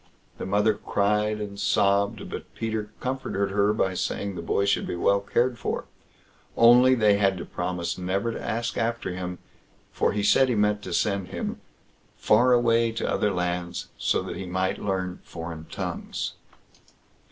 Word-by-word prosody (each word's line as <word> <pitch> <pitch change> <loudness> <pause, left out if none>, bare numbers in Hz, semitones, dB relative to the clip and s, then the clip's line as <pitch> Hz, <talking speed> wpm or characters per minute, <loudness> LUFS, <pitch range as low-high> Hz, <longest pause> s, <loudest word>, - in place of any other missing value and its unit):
The - - -4
mother 105 +3 +3
cried 105 +1 0
and 100 -1 -6
sobbed, 100 0 +2
but - - -8
Peter 110 -2 -3
comforted 125 -7 -2
her 100 +1 +3
by 95 -3 0
saying 100 +2 -2
the 85 - -5
boy 100 +4 0
should 100 - +1
be - - -3
well 100 +3 +3
cared 120 +5 0
for; - - -3 0.7
only 125 +2 +7
they 105 -4 +4
had 95 -2 +2
to 85 - -6
promise 90 0 -3
never 95 +5 -1
to - - -6
ask 115 +1 -2
after 115 -4 -1
him, 90 0 -5 0.5
for - - +1
he 105 0 -1
said 130 +5 +5
he 120 - +1
meant 105 0 +2
to 95 - -6
send 100 -3 0
him - - -5 0.6
far 120 +4 +4
away 115 -1 +3
to 115 - -2
other 105 - +1
lands, 90 -1 -3
so - - 0
that - - -6
he 95 - -6
might 95 +1 -1
learn 95 -2 -2
foreign 80 -1 -7
tongues. - - -4
100 Hz, 165 wpm, -26 LUFS, 95-110 Hz, 0.7 s, only